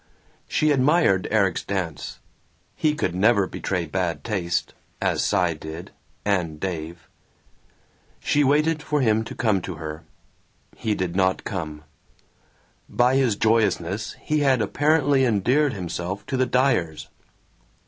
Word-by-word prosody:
She 155 Hz, 0 st, +2 dB
admired 135 Hz, -, +3 dB
Erik's 100 Hz, -5 st, +1 dB
dance; 90 Hz, -7 st, -4 dB, 0.6 s
he 150 Hz, -1 st, +1 dB
could 95 Hz, -, -1 dB
never 100 Hz, +2 st, +3 dB
betray 90 Hz, -1 st, -3 dB
bad 85 Hz, -3 st, -2 dB
taste, 85 Hz, -5 st, -2 dB, 0.3 s
as -, -, 0 dB
Cy 90 Hz, -4 st, +2 dB
did, 80 Hz, +2 st, -8 dB, 0.3 s
and 90 Hz, -7 st, 0 dB
Dave. 85 Hz, -2 st, -5 dB, 1.1 s
She 145 Hz, -, +2 dB
waited 150 Hz, +3 st, +2 dB
for 150 Hz, -1 st, 0 dB
him 110 Hz, -2 st, +2 dB
to -, -, -8 dB
come 105 Hz, -5 st, +1 dB
to 90 Hz, 0 st, -6 dB
her. 80 Hz, 0 st, -6 dB, 0.7 s
He 110 Hz, -2 st, -1 dB
did 90 Hz, -2 st, -3 dB
not 95 Hz, -1 st, +1 dB
come. 75 Hz, -5 st, -5 dB, 1.1 s
By 125 Hz, +2 st, +3 dB
his 130 Hz, -6 st, +3 dB
joyousness 105 Hz, -2 st, +1 dB
he 155 Hz, 0 st, 0 dB
had 135 Hz, -3 st, +3 dB
apparently 145 Hz, +4 st, +2 dB
endeared 125 Hz, +5 st, +2 dB
himself 95 Hz, 0 st, -4 dB
to 135 Hz, -, -3 dB
the 130 Hz, 0 st, +2 dB
Dyers. 95 Hz, -, +1 dB
100 Hz, 130 wpm, -24 LUFS, 85-130 Hz, 1.1 s, admired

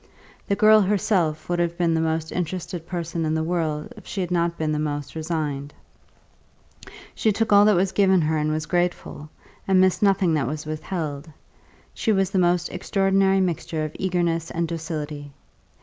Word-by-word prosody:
The 200 Hz, -, +1 dB
girl 215 Hz, +1 st, +6 dB
herself 185 Hz, -5 st, 0 dB
would 175 Hz, 0 st, -1 dB
have 170 Hz, 0 st, -1 dB
been 170 Hz, -2 st, +2 dB
the 160 Hz, -, +1 dB
most 160 Hz, 0 st, -1 dB
interested 175 Hz, -1 st, -4 dB
person 170 Hz, -2 st, -3 dB
in 155 Hz, 0 st, 0 dB
the 160 Hz, -, 0 dB
world 160 Hz, -3 st, -2 dB
if -, -, -14 dB
she 200 Hz, -, -5 dB
had 180 Hz, -1 st, -3 dB
not 170 Hz, -1 st, 0 dB
been 155 Hz, -1 st, -1 dB
the 150 Hz, -, -1 dB
most 145 Hz, -1 st, -3 dB
resigned; 155 Hz, -3 st, -3 dB, 1.4 s
she 220 Hz, -, +1 dB
took 215 Hz, +1 st, 0 dB
all 205 Hz, 0 st, +7 dB
that 210 Hz, -1 st, +5 dB
was 185 Hz, +2 st, +1 dB
given 190 Hz, -2 st, +3 dB
her 155 Hz, 0 st, 0 dB
and 155 Hz, 0 st, 0 dB
was 155 Hz, +1 st, -2 dB
grateful, 175 Hz, -3 st, -2 dB, 0.4 s
and 190 Hz, -1 st, +4 dB
missed 185 Hz, -1 st, +3 dB
nothing 195 Hz, -4 st, +3 dB
that 145 Hz, -5 st, 0 dB
was 150 Hz, +2 st, -4 dB
withheld; 155 Hz, -1 st, -4 dB, 0.6 s
she 220 Hz, -, 0 dB
was 195 Hz, -2 st, +1 dB
the 195 Hz, -, +1 dB
most 175 Hz, -1 st, +2 dB
extraordinary 195 Hz, +1 st, +1 dB
mixture 165 Hz, -3 st, -2 dB
of 155 Hz, -, -7 dB
eagerness 175 Hz, -3 st, 0 dB
and 170 Hz, 0 st, -2 dB
docility. 155 Hz, -3 st, -5 dB
170 Hz, 180 wpm, -23 LUFS, 155-185 Hz, 1.4 s, all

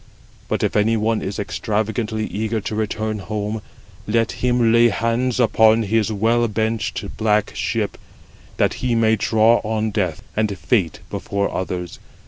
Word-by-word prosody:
But -, -, -1 dB
if -, -, 0 dB
any 110 Hz, +2 st, +3 dB
one 110 Hz, +1 st, 0 dB
is 100 Hz, -, -4 dB
extravagantly 110 Hz, +1 st, -2 dB
eager 110 Hz, +2 st, -2 dB
to 105 Hz, +1 st, -5 dB
return 110 Hz, 0 st, -2 dB
home, 105 Hz, +2 st, -3 dB, 0.5 s
let 115 Hz, -2 st, +1 dB
him 120 Hz, +1 st, +2 dB
lay 120 Hz, 0 st, +6 dB
hands 115 Hz, +3 st, 0 dB
upon 110 Hz, -1 st, +4 dB
his 110 Hz, +1 st, +1 dB
well 115 Hz, +3 st, +2 dB
benched 110 Hz, +1 st, -2 dB
black 105 Hz, -1 st, +1 dB
ship, -, -, -2 dB, 0.6 s
that -, -, +2 dB
he 125 Hz, -2 st, +1 dB
may 110 Hz, -1 st, +3 dB
draw 110 Hz, +2 st, +4 dB
on 110 Hz, 0 st, -1 dB
death 95 Hz, -7 st, -2 dB
and 105 Hz, -2 st, 0 dB
fate 95 Hz, -, 0 dB
before 100 Hz, 0 st, -2 dB
others. 90 Hz, -2 st, -4 dB
110 Hz, 145 wpm, -21 LUFS, 105-115 Hz, 0.6 s, lay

